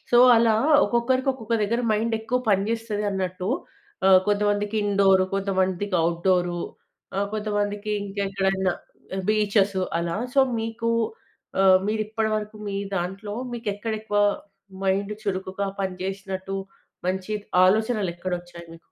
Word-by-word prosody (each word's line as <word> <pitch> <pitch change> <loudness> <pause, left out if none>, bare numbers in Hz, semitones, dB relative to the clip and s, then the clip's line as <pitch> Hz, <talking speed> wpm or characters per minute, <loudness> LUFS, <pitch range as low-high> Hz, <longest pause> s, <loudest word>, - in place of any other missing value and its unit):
So 240 - +7 0.2
అలా 225 -1 +4 0.3
ఒక్కొక్కరికి 255 +3 +1
ఒక్కొక్క 230 -3 -3
దగ్గర 230 +4 0
మైండెక్కువ 225 +2 0
పని 195 -1 +3
జేస్తదన్నట్టు 205 -5 -2 0.6
ఆహ్, 185 -1 +8
కొంతమందికి 205 +1 +1
ఇండోర్, 195 -2 +4
కొంతమందికి 190 0 0
ఔట్‌డోర్ 175 +1 +1 0.6
ఆ! 195 - +1
కొంతమందికి 205 0 -2
ఇంకెక్కడైనా 195 -1 0 0.6
బీచెస్, 205 -2 +2 0.2
అలా 170 0 -2 0.2
సో 275 - +6 0.2
మీకు 230 +1 -2 0.7
ఆహ్, 185 -1 +7
మీరిప్పడిరకు 215 0 -1
మీ 195 - -3 0.2
దాంట్లో 195 +4 -4 0.2
మీకెక్కడెక్కువ 215 -1 -3 0.7
మైండ్ 200 +2 +1
చురుకుగా 190 0 -2
పనిజెశ్నట్టు, 190 +1 -4 0.5
మంచి 190 +2 -2 0.3
ఆలోచనలు 215 0 +2
ఎక్కడొచ్చాయి 175 -1 -5
మీకు? - - -12
200 Hz, 100 wpm, -24 LUFS, 190-215 Hz, 0.7 s, ఆహ్